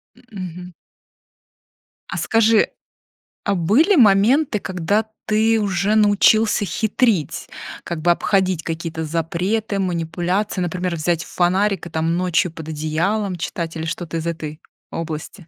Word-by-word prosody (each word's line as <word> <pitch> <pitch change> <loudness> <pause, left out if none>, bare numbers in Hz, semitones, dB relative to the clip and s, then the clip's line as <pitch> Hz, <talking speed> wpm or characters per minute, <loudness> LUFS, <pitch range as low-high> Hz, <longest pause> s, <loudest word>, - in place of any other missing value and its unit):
М, 250 - -22
мгм. 180 -2 -7 1.4
А - - -4
скажи, 225 -1 +3 0.8
а 200 -1 0
были 230 - +3
моменты, 225 - +4
когда 190 +4 -1 0.2
ты 220 +1 +2
уже 200 0 +1
научился 210 0 +4
хитрить, 215 - 0 0.3
как 170 -2 -5
бы 175 +2 +4
обходить 185 -2 +1
какие-то 165 -1 -4
запреты, 180 +6 -1
манипуляции, 180 +3 -1
например, 180 0 -2
взять 170 +1 0
фонарик 185 +1 0
и, - - -10
там, 160 +1 0
ночью 180 -1 +1
под 160 -1 -9
одеялом 170 +6 -1
читать, 170 -1 -4
или 160 0 -4
что-то 165 -1 -4
из 165 - -3
этой 155 -2 -5 0.3
области? 165 +2 -6
180 Hz, 125 wpm, -20 LUFS, 165-210 Hz, 1.4 s, моменты